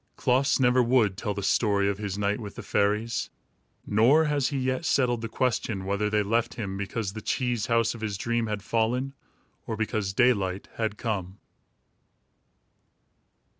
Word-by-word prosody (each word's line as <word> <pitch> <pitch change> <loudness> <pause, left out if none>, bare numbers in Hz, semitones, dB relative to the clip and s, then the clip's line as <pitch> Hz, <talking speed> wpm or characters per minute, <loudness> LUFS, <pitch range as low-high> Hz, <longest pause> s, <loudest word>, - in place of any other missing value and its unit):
Klaas 130 +3 +2
never 125 -1 +4
would 120 -5 +3
tell 105 0 -3
the 100 - -4
story 100 0 +2
of 100 0 -1
his 100 -2 -4
night 105 +1 0
with 105 -3 -8
the 120 - -7
fairies, 105 +2 0 0.6
nor 125 +10 +4
has 145 -3 +1
he 140 - -2
yet 130 +3 -1
settled 125 -6 +1
the 115 - -4
question 110 -5 -1
whether 100 +2 0
they 105 0 +2
left 115 +3 0
him 100 -4 -4
because 100 +1 -3
the 110 - -6
cheese 120 -2 -1
house 115 -1 +2
of 115 - -10
his 105 -3 -3
dream 115 +2 -1
had 105 -2 -3
fallen, 120 +5 0 0.5
or 110 - -3
because 110 -2 -1
daylight 100 -4 +1
had 110 -2 -2
come. 100 -5 -3
110 Hz, 165 wpm, -27 LUFS, 100-125 Hz, 0.6 s, never